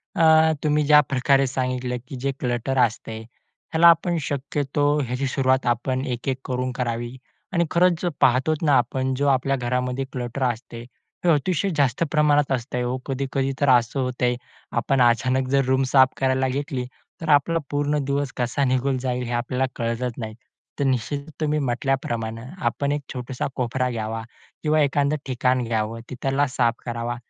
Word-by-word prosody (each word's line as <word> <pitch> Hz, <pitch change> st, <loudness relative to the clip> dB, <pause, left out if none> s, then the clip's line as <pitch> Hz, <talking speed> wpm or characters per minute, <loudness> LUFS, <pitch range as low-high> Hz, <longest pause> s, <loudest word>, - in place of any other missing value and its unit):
अ, 160 Hz, -1 st, +5 dB
तुम्ही 150 Hz, 0 st, +2 dB
ज्या 150 Hz, 0 st, +7 dB
प्रकारे 135 Hz, +1 st, +3 dB
सांगितलं, 125 Hz, -1 st, -2 dB
की 135 Hz, -, -7 dB
जे 140 Hz, 0 st, 0 dB
क्लटर 125 Hz, +1 st, -1 dB
असते 110 Hz, -1 st, 0 dB, 0.5 s
त्याला 165 Hz, +1 st, +6 dB
आपण 170 Hz, +1 st, +4 dB
शक्यतो 145 Hz, +1 st, 0 dB
याची 125 Hz, +2 st, -1 dB
सुरुवात 130 Hz, 0 st, +1 dB
आपण 130 Hz, +2 st, 0 dB
एक-एक 130 Hz, 0 st, -2 dB
करून 125 Hz, 0 st, -2 dB
करावी. 120 Hz, 0 st, -3 dB, 0.4 s
आणि 170 Hz, -1 st, +2 dB
खरंच 175 Hz, -1 st, +3 dB
जर 175 Hz, -, 0 dB
पाहतो 130 Hz, +5 st, +4 dB
ना 145 Hz, -, +4 dB
आपण, 130 Hz, +2 st, 0 dB
जो 145 Hz, +2 st, 0 dB
आपल्या 135 Hz, 0 st, +2 dB
घरामध्ये 125 Hz, +1 st, -1 dB
क्लटर 125 Hz, +1 st, -3 dB
असते, 120 Hz, -1 st, -3 dB, 0.4 s
हे 175 Hz, -, +4 dB
अतिशय 180 Hz, +6 st, 0 dB
जास्त 140 Hz, +2 st, +2 dB
प्रमाणात 150 Hz, -2 st, +3 dB
असतं 125 Hz, -1 st, -2 dB
हो. 125 Hz, +1 st, -1 dB
कधी-कधी 135 Hz, 0 st, -1 dB
तर 145 Hz, -, +3 dB
असं 125 Hz, +1 st, +3 dB
होतंय, 125 Hz, -1 st, 0 dB, 0.4 s
आपण 125 Hz, +3 st, +2 dB
अचानक 130 Hz, +2 st, +2 dB
जर 135 Hz, -1 st, +2 dB
रूम 130 Hz, +1 st, +2 dB
साफ 130 Hz, -1 st, +7 dB
करायला 130 Hz, 0 st, +1 dB
घेतली 130 Hz, -1 st, -3 dB, 0.4 s
तर 160 Hz, -, -4 dB
आपला 150 Hz, +3 st, +4 dB
पूर्ण 145 Hz, +1 st, 0 dB
दिवस 140 Hz, -1 st, -1 dB
कसा 125 Hz, +3 st, 0 dB
निघून 130 Hz, +1 st, +1 dB
जाईल 125 Hz, -1 st, -2 dB
हे 120 Hz, -, -5 dB
आपल्याला 125 Hz, +2 st, 0 dB
कळतच 115 Hz, +1 st, -2 dB
नाही. 110 Hz, -3 st, -5 dB, 0.5 s
तर -, -, +1 dB
निश्चित 130 Hz, +2 st, 0 dB, 0.2 s
तुम्ही 150 Hz, 0 st, +1 dB
म्हटल्याप्रमाणे 120 Hz, -3 st, -2 dB, 0.2 s
आपण 140 Hz, +4 st, 0 dB
एक 145 Hz, 0 st, -1 dB
छोटासा 125 Hz, 0 st, -4 dB
कोपरा 125 Hz, 0 st, -1 dB
घ्यावा 115 Hz, -1 st, -3 dB, 0.4 s
किंवा 155 Hz, 0 st, +3 dB
एखादं 145 Hz, +1 st, +2 dB
ठिकाण 130 Hz, -1 st, +1 dB
घ्यावं, 115 Hz, -1 st, -2 dB
तिथला 135 Hz, +3 st, 0 dB
साफ 120 Hz, -2 st, +1 dB
करावा. 120 Hz, 0 st, -3 dB
130 Hz, 160 wpm, -23 LUFS, 125-140 Hz, 0.5 s, ज्या